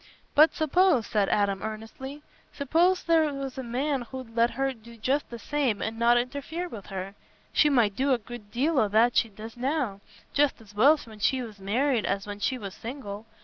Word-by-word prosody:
"But 310 +2 +6
suppose," 315 - +3
said 205 -2 +1
Adam, 200 -2 +1
earnestly, 225 +7 -7 0.3
"suppose 335 +6 +2
there 320 -3 +3
was 275 -2 -5
a - - -3
man 265 +3 -1
as 240 - -9
'ud 255 -4 -8
let 235 0 +4
her 270 0 +1
do 230 0 -15
just 265 +6 0
the 235 - -7
same 260 -2 -1
and 225 +1 -4
not 235 +1 +5
interfere 285 +8 -3
with 215 - -9
her—she 195 +9 -2
might 230 -8 +3
do 270 +1 +1
a 255 - +4
good 235 -2 -10
deal 275 +6 +1
o' 215 - +3
what 225 +4 +4
she 225 - +3
does 220 +3 -10
now, 250 -6 -1 0.3
just 285 -2 +2
as 210 -2 -16
well 275 +10 +6
when 220 -2 -13
she 255 +5 +1
was 215 -4 -10
married 235 +5 +1
as 195 0 -1
when 205 0 -6
she 255 +5 0
was 200 -5 -7
single. 225 -4 -7
240 Hz, 200 wpm, -27 LUFS, 215-280 Hz, 0.3 s, But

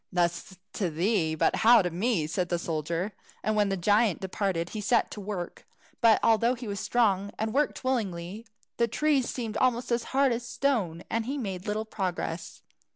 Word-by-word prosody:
"Thus 175 +1 -1 0.2
to 190 -4 -1
thee, 165 0 +1
but - - +2
how 230 -1 +6
to 180 - -1
me?" 185 -1 0
said 175 +3 -2
the 175 - +1
soldier; 170 +4 -2 0.3
and 215 - +1
when 205 -1 +3
the 195 - -1
giant 205 +2 +3
departed 190 -3 -2
he 215 - -5
set 230 +3 +2
to 210 - -7
work. 190 -3 -6 0.3
But 230 -2 +6
although 230 +2 +4
he 245 -1 -8
was 200 -1 -3
so - - -4
strong, 200 -5 +2
and 220 0 -2
worked 290 0 0
willingly, 210 -4 -2 0.3
the 235 - +3
trees 275 +2 +1
seemed 225 -4 -4
almost 250 -1 +1
as 235 0 +1
hard 275 0 +2
as 235 +1 -1
stone, 215 -12 -1
and 225 0 -1
he 280 +2 -2
made 195 -7 -4
little 215 +1 -1
progress. 185 -5 -4
210 Hz, 190 wpm, -28 LUFS, 180-235 Hz, 0.3 s, how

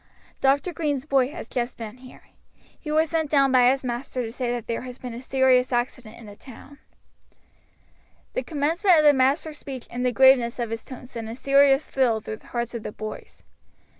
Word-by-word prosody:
Dr. 280 +6 +2
Green's 290 -5 -2
boy 270 -4 +2
has 320 - -8
just 245 0 -3
been 225 0 -8
here. 255 0 -15 0.6
He 305 - -8
was 315 +1 +1
sent 320 -2 0
down 275 -2 +3
by 250 -1 +5
his 270 +1 0
master 250 +1 -4
to 225 - -5
say 245 0 -3
that 240 -2 -4
there 230 - -3
has 250 -1 -8
been 250 -3 -7
a 235 - -7
serious 260 -1 +2
accident 240 -2 -3
in 230 - -13
the 205 -1 -11
town." 275 +5 -14 1.5
The - - -1
commencement 330 +4 +2
of 305 - +4
the 295 -1 +7
master's 285 +3 +1
speech 265 -3 -8
and 245 +1 -3
the 250 - +2
graveness 255 -2 +4
of 235 -2 -3
his 225 0 -4
tone 255 -2 -10
sent 230 -3 -7
a 225 - -6
serious 275 +2 +3
thrill 245 -5 +1
through 215 0 -7
the - - -21
hearts 240 0 -4
of 235 - -5
the - - -6
boys. 215 +1 -9
Mr. - - -39
255 Hz, 210 wpm, -24 LUFS, 240-280 Hz, 1.5 s, the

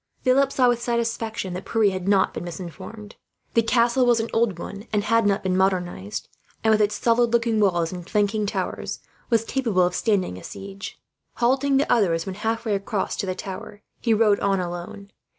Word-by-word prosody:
Philip 270 +1 +3
saw, 255 -2 +3
with 240 -1 +2
satisfaction, 230 -4 -2
that 180 - -5
Pierre 220 -3 +2
had 185 0 -4
not 200 -1 +3
been - - -5
misinformed. 190 +5 -8 0.4
The 230 - +5
castle 235 +2 +3
was 240 -2 +4
an 225 - -3
old 225 -5 +2
one 200 +5 -8
and 210 -1 +1
had 230 0 +3
not 200 -1 +1
been 185 -1 0
modernized 180 - -1 0.4
and, 220 - +4
with 215 0 +4
its 210 0 +2
solid 235 0 +3
looking 230 -2 +2
walls 175 -5 +2
and 180 -1 -8
flanking 210 0 +1
towers, - - -3 0.3
was 230 -3 +3
capable 225 -9 +1
of 180 0 +1
standing 185 - 0
a - - -14
siege. 195 0 -8 0.4
Halting 270 +3 +2
the 285 - +1
others, 170 -8 +2
when 190 - -4
halfway 220 +2 -2
across 200 +1 -2
to 195 - -2
the 185 - -2
tower, 200 +2 -8 0.2
he 235 - 0
rode 215 -2 +4
on 195 -1 +1
alone. 180 +3 -6
210 Hz, 190 wpm, -24 LUFS, 190-230 Hz, 0.4 s, The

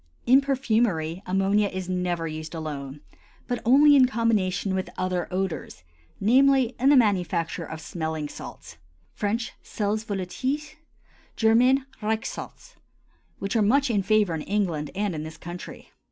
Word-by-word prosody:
In 260 +3 +6
perfumery 220 - 0
ammonia 195 +2 +2
is 185 -2 -5
never 180 -2 -1
used 155 +1 -6
alone, 145 -3 -6 0.5
but 245 -1 -2
only 285 +5 +6
in 260 -2 +6
combination 210 -5 0
with 190 0 -2
other 185 -1 -1
odors, 180 - -4 0.4
namely, 260 +2 +4
in 265 +3 +4
the 290 - +7
manufacture 180 -7 +1
of 160 - -7
smelling 160 -2 -4
salts - - -10 0.4
(French: 220 +2 -2
sels 215 +1 -2
volatils; 255 +10 -3 0.6
German: 250 +4 +4 0.2
Riechsalze), 220 +1 -4 0.6
which 195 +4 -3
are 225 - +3
much 260 +5 +3
in 205 -3 +2
favor 210 -2 +2
in 160 - -3
England 170 -6 -1
and 200 -1 -1
in 155 - -4
this 160 +1 -8
country. 175 +1 -9
200 Hz, 140 wpm, -25 LUFS, 175-235 Hz, 0.6 s, the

